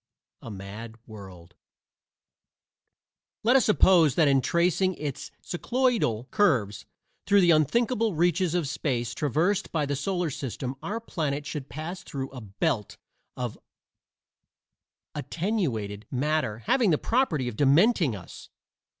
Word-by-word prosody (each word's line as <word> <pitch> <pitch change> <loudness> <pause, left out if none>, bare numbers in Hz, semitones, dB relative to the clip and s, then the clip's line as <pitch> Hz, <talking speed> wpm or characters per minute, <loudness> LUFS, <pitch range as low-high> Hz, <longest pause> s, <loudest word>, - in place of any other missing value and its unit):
A - - -9
MAD 105 +3 -8
WORLD 95 -5 -12 1.9
Let 240 +4 +4
us 265 - +5
suppose 175 - +5
that 160 -3 +4
in 135 -1 +4
tracing 180 +4 +1
its 145 -3 -5
cycloidal 220 - 0
curves 125 - +1 0.4
through 200 0 +5
the 175 -2 +5
unthinkable 225 - +2
reaches 175 +1 +1
of 170 -5 0
space 125 -5 -2
traversed 165 - 0
by 155 -3 0
the 140 0 -2
solar 175 +3 -1
system 130 -1 -4
our 220 +3 -3
planet 150 -10 -3
should 145 -2 -6
pass 155 +8 -6
through 135 -1 -6
a 130 -2 -8
"belt" 110 - -2 0.4
of 125 -3 -4 1.5
attenuated 130 - -3
matter 130 -5 -1
having 240 - +3
the 155 - +3
property 185 - 0
of 120 - -4
dementing 150 - +3
us! 95 - -11
150 Hz, 125 wpm, -27 LUFS, 125-185 Hz, 1.9 s, us